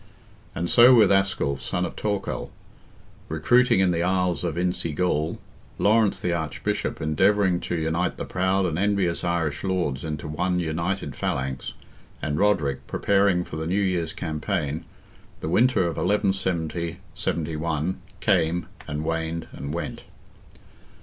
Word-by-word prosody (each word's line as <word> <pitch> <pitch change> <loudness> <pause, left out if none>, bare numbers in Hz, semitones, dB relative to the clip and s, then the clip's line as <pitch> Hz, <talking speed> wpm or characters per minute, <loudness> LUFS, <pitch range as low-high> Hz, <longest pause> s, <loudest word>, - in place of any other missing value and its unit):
And 85 - -1
so 120 +6 +8
with 110 -5 +6
Asculph, 95 -8 +1
son 90 - -1
of - - -6
Torcall, 105 -2 -2 0.8
recruiting 110 +7 +4
in 95 -2 +3
the 85 -1 0
isles 90 -1 +1
of 85 -3 -1
Insi 90 -3 -1
Gall, 80 -3 0 0.4
Lawrence, 110 0 +3
the 90 - -1
Archbishop, 80 -3 -2
endeavouring 95 +4 +2
to - - -3
unite 80 +2 -1
the - - -4
proud 95 +1 +1
and 85 -1 -1
envious 100 -4 +1
Irish 85 -4 -1
lords 90 -8 -1
into 75 -2 -4
one 90 +4 0
united 85 -1 -2
phalanx, 65 0 -3 0.5
and 75 0 -2
Roderick, 75 -10 +1
preparing 100 -3 +2
for 80 - -7
the 80 0 -3
new 95 +4 +1
year's 90 -5 0
campaign, 75 -1 -2 0.5
the - - -4
winter 125 +7 +4
of 85 -2 -1
1170 90 -4 0 0.2
'71, 80 +2 -2 0.2
came, 85 -4 +2 0.2
and 75 +2 -3
waned, 80 0 -2
and 70 +1 -6
went. 85 +2 -5
85 Hz, 135 wpm, -25 LUFS, 80-95 Hz, 0.8 s, so